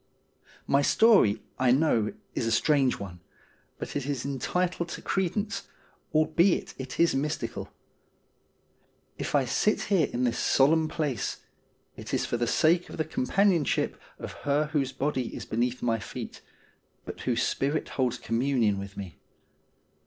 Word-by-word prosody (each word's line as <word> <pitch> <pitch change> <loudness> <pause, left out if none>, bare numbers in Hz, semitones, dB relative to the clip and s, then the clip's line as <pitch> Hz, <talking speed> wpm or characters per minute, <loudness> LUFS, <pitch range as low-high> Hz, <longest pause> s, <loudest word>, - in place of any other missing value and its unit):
My 140 - +3
story, 145 - +4 0.2
I 130 -1 +3
know, 125 -5 +3 0.2
is 115 - -1
a - - 0
strange 135 +2 +3
one, 90 -3 -8 0.6
but - - -6
it 140 -2 -2
is 140 -4 -2
entitled 170 +6 -1
to - - -6
credence, 200 +3 -1 0.4
albeit 160 +4 +2
it 130 0 -6
is 170 0 +4
mystical. 140 +3 -3 1.5
If - - -2
I 140 -2 +3
sit 210 - +1
here 165 -7 +4
in 125 - -1
this 120 -1 0
solemn 155 +4 +4
place 150 -8 -2 0.5
it - - -4
is - - 0
for 120 - -1
the 120 0 0
sake 170 +7 +3
of - - -8
the 160 - 0
companionship 170 +3 +1 0.2
of - - -7
her 145 +1 +1
whose 135 -4 +1
body 135 -4 -2
is - - -6
beneath 120 +2 -1
my 115 -2 +1
feet, 100 - -7 0.6
but - - -7
whose - - 0
spirit 145 +3 -1
holds 125 -2 0
communion 115 -3 +1
with 100 0 -8
me. 95 -4 -8
140 Hz, 145 wpm, -28 LUFS, 120-160 Hz, 1.5 s, story